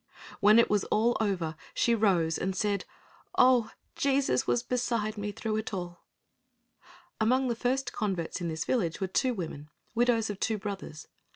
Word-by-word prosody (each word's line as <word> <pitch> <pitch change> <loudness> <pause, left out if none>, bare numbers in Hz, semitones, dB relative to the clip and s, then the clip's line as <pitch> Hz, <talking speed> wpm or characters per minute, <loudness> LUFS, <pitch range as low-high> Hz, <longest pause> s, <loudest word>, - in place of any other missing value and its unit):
When 210 +3 +6
all 235 - +6
was 205 -2 +1 0.4
over, 180 -7 -1 0.2
she 235 - +3
rose 185 -8 +2
and 190 0 -2
said, 200 0 0 0.5
"Oh, 250 -3 +5 0.3
Jesus 275 - +1
was 120 -1 +1
beside 235 -4 -1
me 205 0 -4
through 215 +1 -3
it 220 -1 -3
all." 175 -2 -6 1.2
Among 255 +4 +2
the 235 - 0
first 255 +3 -1
converts 185 -5 -2
in 175 - -2
this 160 -1 -3
village 180 -11 0
were 195 - 0
two 245 +7 0
women, 155 -5 -6 0.2
widows 230 -2 +2
of 205 - -8
two 220 - 0
brothers. 195 -6 -7
210 Hz, 160 wpm, -29 LUFS, 180-235 Hz, 1.2 s, When